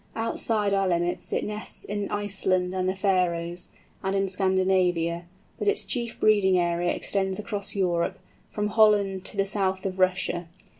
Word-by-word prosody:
Outside 220 -2 -1
our 195 -1 +2
limits 175 0 -1
it - - 0
nests 210 +1 -6
in 205 0 -3
Iceland 190 -3 0
and 185 0 0
the - - 0
Faröes, 180 -3 0 0.3
and 195 0 0
in 195 0 +1
Scandinavia; 185 -3 +1 0.3
but - - -2
its 410 0 +2
chief 235 -3 -3
breeding 200 -3 +4
area 175 0 +1
extends 190 -1 0
across 205 -1 -1
Europe, 175 -3 0 0.3
from 210 0 -2
Holland 205 -3 +3
to - - -5
the 195 - +2
south 190 -1 -1
of 190 -1 -3
Russia. 180 -2 +1
190 Hz, 155 wpm, -26 LUFS, 180-205 Hz, 0.3 s, breeding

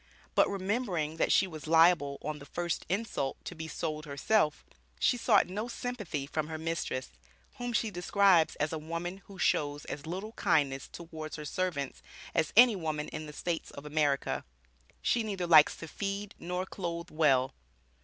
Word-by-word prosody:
But - - +4
remembering 190 -6 -1
that - - +2
she - - +5
was 155 -5 -8
liable, 160 -3 +5
"on 150 0 -3
the 140 - -11
first 175 0 -3
insult," 195 -8 -1
to - - -5
be 160 -1 -6
sold 155 -1 -4
herself, 150 +3 +1 0.3
she - - +3
sought 225 -4 +4
no 210 +5 -4
sympathy 215 - -4
from 150 +2 -2
her 160 0 -4
mistress, 160 -5 -3 0.5
whom 245 0 -3
she 225 -2 0
describes 180 -2 +4
as 150 +2 -1
"a 160 - -2
woman 170 +4 -5
who 195 - -12
shows 145 -4 +1
as 145 +2 -6
little 190 +6 -4
kindness 145 - +1
towards 160 -2 -7
her 150 - -7
servants 150 -5 -2 0.3
as 155 - +1
any 240 -2 +9
woman 155 -4 -3
in 155 0 -6
the - - -7
States 170 +1 -3
of 140 - -10
America. 150 -2 0 0.6
She 240 - +2
neither 200 -5 -2
likes 155 -3 +7
to 165 - -8
feed 200 +3 -4
nor 180 +2 -3
clothe 170 -2 -5
well." 135 -5 +3
165 Hz, 170 wpm, -31 LUFS, 150-195 Hz, 0.6 s, any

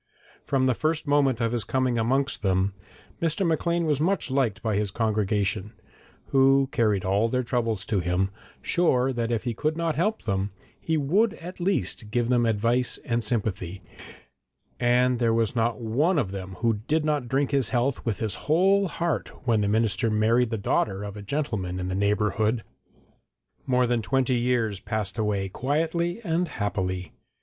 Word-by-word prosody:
From 135 -2 +1
the 130 - +3
first 155 +5 -1
moment 140 -4 +2
of 115 -1 +1
his 120 -3 -1
coming 130 -3 0
amongst 135 +5 0
them 95 0 +1 0.5
Mr. 165 +4 +1
Maclean 170 +1 +1
was 150 -2 +1
much 180 -3 0
liked 130 -6 0
by 110 -3 0
his 105 0 0
congregation, 105 -1 -1 0.6
who 135 0 +4
carried 105 -5 +1
all 100 +4 +2
their 125 +2 0
troubles 115 -6 -1
to 105 -3 0
him, 90 +2 0 0.3
sure 135 -7 +2
that 120 -1 -2
if 115 -2 -1
he 120 - -2
could 155 +7 -1
not 165 -1 0
help 210 +8 -1
them, 100 -2 -1 0.3
he 160 -1 -1
would 190 +10 +2
at 180 +3 -9
least 175 - -1
give 120 +1 0
them 120 -2 +3
advice 115 +3 +1
and 115 -1 0
sympathy, 100 -5 -3 1.0
and 125 0 +3
there 115 -2 +2
was 115 +1 0
not 115 +1 0
one 140 +11 +1
of 110 -10 0
them 95 -1 -6
who 115 -3 +1
did 155 0 +1
not 150 -5 0
drink 135 +2 0
his 135 -6 +2
health 125 +2 0
with 110 -5 -1
his 110 -3 -1 0.2
whole 195 +5 +4
heart 170 -2 -2 0.2
when 115 -3 +2
the 100 - +1
minister 110 +2 +1
married 110 +3 +2
the 115 - -2
daughter 100 0 0
of 100 0 -6
a 105 - -7
gentleman 100 -7 -2
in 90 0 -3
the - - -2
neighbourhood. 105 +3 +1 1.0
More 125 -1 +3
than 120 -1 +1
twenty 130 +3 +1
years 120 -4 0
passed 105 +1 -3
away 105 -3 0
quietly 165 - -1
and 175 -1 0
happily. 95 - -3
120 Hz, 175 wpm, -26 LUFS, 105-140 Hz, 1.0 s, who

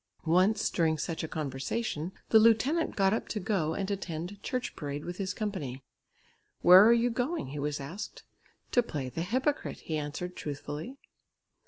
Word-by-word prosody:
Once 185 +6 +3
during 160 -2 +2
such 160 +2 -3
a - - -2
conversation 155 - -3 0.2
the 220 - +7
lieutenant 230 +9 +3
got 195 0 +3
up 225 - -2
to 215 - -3
go 180 -6 0
and 195 0 -2
attend 185 0 -4
church 250 +2 -3
parade 145 -1 -5
with 175 +1 -5
his 195 -1 -2
company. 180 - -4 0.8
"Where 180 +3 +10
are 225 - +7
you 235 +1 +3
going?" 250 - -2
he 145 +2 -5
was 145 0 -2
asked. 160 +10 -7 0.5
"To 245 - +5
play 145 - -4
the 145 +6 -4
hypocrite," 260 - -1
he 155 - -3
answered 155 +5 -4
truthfully. 150 - -6
180 Hz, 165 wpm, -30 LUFS, 150-220 Hz, 0.8 s, Where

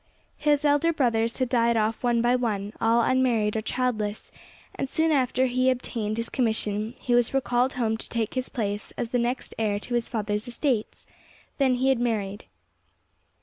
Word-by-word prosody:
His 295 0 +2
elder 290 +3 +3
brothers 235 -7 +1
had 255 - 0
died 235 -1 +2
off 220 +1 0
one 240 -1 +2
by 240 +1 +3
one, 210 -4 -2
all 230 +1 +4
unmarried 235 -5 +2
or 220 - 0
childless, 220 -3 -2 0.4
and 270 - -4
soon 320 +2 +1
after 260 -2 +2
he 255 +1 +2
obtained 230 -4 -2
his 230 0 -2
commission 220 -2 -1
he 245 - -1
was 240 +2 +2
recalled 250 0 +1
home 225 -3 0
to - - -10
take 225 -2 -2
his 255 -1 -3
place 205 -4 -3
as 235 - -3
the 245 - +1
next 245 +2 -2
heir 210 -2 0
to 245 - -6
his 240 -1 0
father's 210 -1 -2
estates; 245 -2 -2 0.5
then 265 -2 +3
he 260 +2 +1
had 265 -3 +2
married. 210 -4 -2
240 Hz, 180 wpm, -26 LUFS, 220-255 Hz, 0.5 s, all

